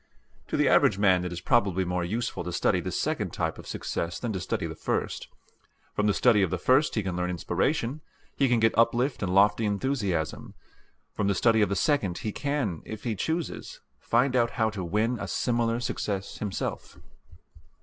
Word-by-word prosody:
To - - -2
the - - +3
average - - +4
man 95 -3 +3
it 90 - -4
is 85 0 -5
probably 95 -3 +2
more 90 0 -1
useful 110 +2 -2
to 90 - -3
study 85 - +1
this - - -3
second - - -1
type - - -2
of - - -11
success 85 +1 -3
than 120 -3 -3
to 95 - -2
study 90 - -2
the - - -4
first. - - -3 0.7
From 105 - +1
the 105 - +3
study 115 -5 +4
of 95 - +2
the 90 - -1
first 130 - +3
he 110 - 0
can 95 -2 -3
learn 90 0 -1
inspiration, 115 - -1 0.3
he 135 -2 +2
can 120 -1 +3
get 110 0 +3
uplift 120 +3 +2
and 95 -3 -1
lofty 100 +4 +4
enthusiasm. 100 - -2 0.6
From 100 - -1
the 100 - +2
study 115 +1 +3
of 105 - +3
the 100 - 0
second 100 - +1
he 110 - -3
can, 135 - -2
if 110 -1 -8
he 115 - -1
chooses, 160 - -3 0.2
find 125 +3 +1
out 120 -2 +3
how 110 -2 +2
to 100 -3 -5
win 110 +7 0
a 100 - -4
similar 115 +4 0
success 105 -5 -3
himself. 105 -3 -4
105 Hz, 195 wpm, -27 LUFS, 95-120 Hz, 0.7 s, average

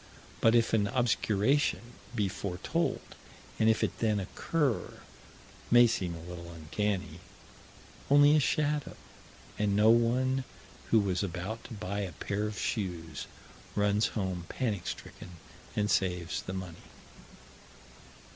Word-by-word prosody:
But 115 +1 +5
if 115 -1 +3
an 105 -2 +3
obscuration 120 +2 +1 0.2
be 105 -2 +1
foretold, 95 -1 -2 0.6
and 110 - +5
if 110 - +2
it - - -2
then 110 -2 +2
occur 135 - -1 0.8
may 120 0 +8
seem 90 -7 -1
a 80 - -9
little 85 0 -8
uncanny 90 +5 -3 0.9
only 145 +1 +7
a - - +5
shadow 150 0 0 0.6
and 105 -1 +2
no 105 +2 +6
one 130 +3 +2 0.5
who 115 - +5
was 95 -4 0
about 95 +4 -4
to 115 - -8
buy 100 0 -4
a 95 -4 -3
pair 100 +6 -2
of 105 - -6
shoes 85 -8 -3 0.5
runs 105 +1 +2
home 95 -4 -2
panic 105 -8 -2
stricken 90 -1 -8 0.4
and 105 0 +1
saves 90 -2 0
the 95 - -6
money. 95 -3 -6
105 Hz, 130 wpm, -30 LUFS, 90-115 Hz, 0.9 s, may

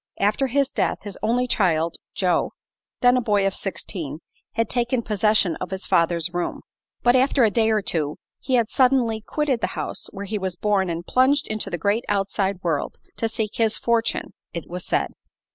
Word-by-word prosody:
After 210 +7 +2
his 275 +2 +1
death - - 0
his 205 -2 -7
only 235 +4 +2
child, 170 -8 +1 0.2
Joe, 180 -3 +1 0.5
then 245 0 +6
a - - +2
boy 205 -4 +2
of 195 - +1
sixteen, 170 -7 -4 0.4
had 230 0 +1
taken 240 +1 0
possession 210 -3 +2
of 180 - -5
his 190 0 -3
father's 170 0 +1
room; 175 0 -2 0.4
but 240 +1 +5
after 260 0 +4
a 220 - +4
day 225 +1 +3
or 215 -2 +2
two 155 -5 -1 0.2
he 260 - 0
had 235 -3 +3
suddenly 250 -4 +3
quitted 275 0 -1
the - - +1
house - - -4
where 200 0 -6
he 210 +1 -2
was 190 -2 -2
born 195 -1 +1
and 170 +1 -3
plunged 270 +3 +3
into 215 -1 -3
the 175 - -2
great 205 +7 +1
outside 195 -1 0
world 165 -4 -1 0.2
to 225 - 0
seek 220 -1 -3
his 225 -2 +2
fortune, 235 -1 0 0.2
it 170 - -5
was 180 +1 -5
said. - - +1
210 Hz, 190 wpm, -23 LUFS, 185-235 Hz, 0.5 s, then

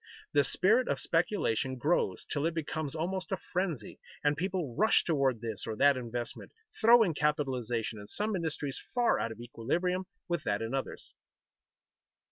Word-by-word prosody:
The 145 - +5
spirit 215 - +3
of - - 0
speculation 165 - 0
grows 130 - 0
till 145 +2 0
it 165 - -3
becomes 155 -2 -3
almost 185 +4 -3
a 190 - +1
frenzy, 175 - -3 0.2
and 145 0 +3
people 180 -7 -2
rush 220 - +4
toward 135 -8 +1
this 110 -3 -4
or 110 - -2
that 140 +4 +5
investment, 120 -1 -5 0.3
throwing 225 -5 +6
capitalization 130 -7 -1
in 105 - -10
some 210 - -1
industries 155 -5 -3
far 245 -1 +3
out 115 - -1
of 110 - -9
equilibrium 175 +11 -1 0.2
with 170 -3 -1
that 100 0 0
in 115 +3 -4
others. 135 -1 -4
150 Hz, 155 wpm, -31 LUFS, 120-180 Hz, 0.3 s, throwing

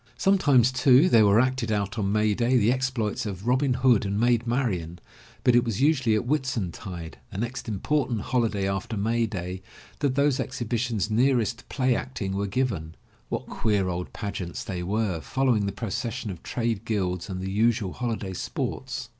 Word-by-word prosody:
Sometimes, 145 - +4
too, 130 +5 +5
there 110 - +6
were 100 +2 +5
acted 130 -2 +1
out 105 +1 -1
on 100 -1 0
May 105 0 +2
day 120 +3 +2
the 115 0 +3
exploits 125 -5 -1
of 100 0 -6
Robin 130 +1 +2
Hood 125 -4 +4
and 100 +1 -1
Maid 120 0 +2
Marian, 95 -10 -1 0.5
but 125 - +5
it 120 - +5
was 115 -5 -2
usually 130 -6 +3
at 110 - -1
Whitsuntide, 100 - -3
the 95 - -7
next 120 +4 -4
important 120 +2 0
holiday 110 -6 0
after 100 +3 -3
May 115 +3 +1
day, 95 -2 -5 0.4
that 140 -3 0
those 140 -1 +2
exhibitions 120 -3 -2
nearest 120 0 +2
to - - -16
play 130 -2 +1
acting 105 -8 -4
were 100 +1 -1
given. 95 -9 -2 0.3
What - - -3
queer 100 -4 0
old 90 0 -4
pageants 100 -5 -5
they 90 -2 -4
were, 95 -2 -1
fol 135 +1 -1
lowing 110 -6 +2
the - - -1
procession 115 +1 -4
of 90 -2 -9
trade 115 -3 -2
guilds 90 -4 -2
and 95 -1 -4
the 95 +1 -4
usual 110 -2 +1
holiday 110 -6 -3
sports. - - -4
115 Hz, 180 wpm, -26 LUFS, 100-125 Hz, 0.5 s, there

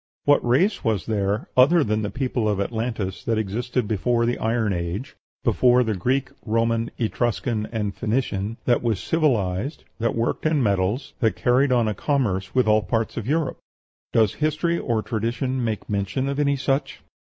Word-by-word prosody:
What 145 0 +4
race 140 - +2
was 110 -5 0
there, 105 0 -1
other 145 +6 +6
than 110 -2 0
the 105 - -2
people 125 -4 -1
of 100 -2 0
Atlantis, 110 -2 -3
that 115 -1 +1
existed 115 +3 -1
before 115 +3 +1
the 120 - -1
Iron 110 -2 0
Age 90 - -4 0.3
before 125 +1 +4
the 110 -2 -1
Greek, 125 +8 0
Roman, 115 +1 0
Etruscan, 110 -1 -1
and 105 -3 -2
Phoenician 110 -2 -2
that 120 - +3
was 115 -4 0
civilized, 125 - 0 0.2
that 115 0 0
worked 115 +6 0
in 155 -4 +2
metals, 100 +4 0
that 115 -4 +2
carried 130 +3 +2
on 120 -3 +3
a 105 - 0
commerce 100 -6 -1
with 125 -3 +3
all 110 0 +4
parts 115 0 -1
of 115 -1 -4
Europe? 155 +1 0 0.5
Does 110 -3 +3
history 155 +3 0
or 115 -3 -1
tradition 120 +3 -2
make 110 -3 -3
mention 100 +6 -1
of 140 +1 -2
any 140 -1 +2
such? 135 0 -2
115 Hz, 170 wpm, -23 LUFS, 105-130 Hz, 0.5 s, other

